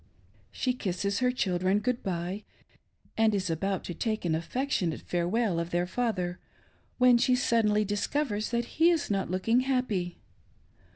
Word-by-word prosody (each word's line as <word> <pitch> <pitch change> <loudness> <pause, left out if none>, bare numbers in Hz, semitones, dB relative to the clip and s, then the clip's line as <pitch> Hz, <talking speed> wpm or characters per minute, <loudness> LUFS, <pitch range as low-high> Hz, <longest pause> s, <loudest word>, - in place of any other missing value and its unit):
She 255 - 0
kisses 200 -3 -2
her 250 -1 +3
children 185 -5 +1
good 245 +3 -1
bye, 185 +2 -3 0.7
and 220 -1 +3
is 185 -3 -1
about 190 +4 -1
to 175 - -5
take 215 +3 -2
an 165 - +1
affectionate 180 - -1
farewell 180 +2 0
of 170 0 -3
their 175 0 0
father 185 -4 -2 0.6
when 250 -1 +6
she 250 +1 +3
suddenly 215 -4 +2
discovers 210 +2 -1
that 235 0 0
he 325 +7 +3
is 330 -10 0
not 195 -1 0
looking 190 +7 +2
happy. 250 -10 -1
205 Hz, 150 wpm, -29 LUFS, 180-245 Hz, 0.7 s, when